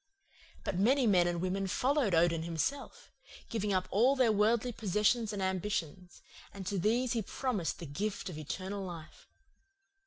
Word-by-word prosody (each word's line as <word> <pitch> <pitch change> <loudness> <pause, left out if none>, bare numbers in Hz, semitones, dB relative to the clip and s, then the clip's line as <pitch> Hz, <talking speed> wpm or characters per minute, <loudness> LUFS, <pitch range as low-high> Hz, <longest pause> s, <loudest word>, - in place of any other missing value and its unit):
But 180 - -2
many 255 +6 +4
men 180 -5 +4
and 175 -1 -1
women 190 +2 -1
followed 255 - +1
Odin 165 0 +3
himself, 170 - -3 0.4
giving 210 -2 -1
up 185 -1 +1
all 245 +7 +4
their 255 -4 +4
worldly 220 +3 +2
possessions 215 +2 +1
and 200 -2 -3
ambitions; 185 -2 -3 0.3
and 195 -1 -8
to 195 +1 -1
these 235 +6 +1
he 230 - 0
promised 210 -4 -2
the 170 - -7
gift 190 +8 -3
of 180 - -6
eternal 190 +6 -4
life. 170 -4 -9
200 Hz, 155 wpm, -32 LUFS, 180-230 Hz, 0.4 s, many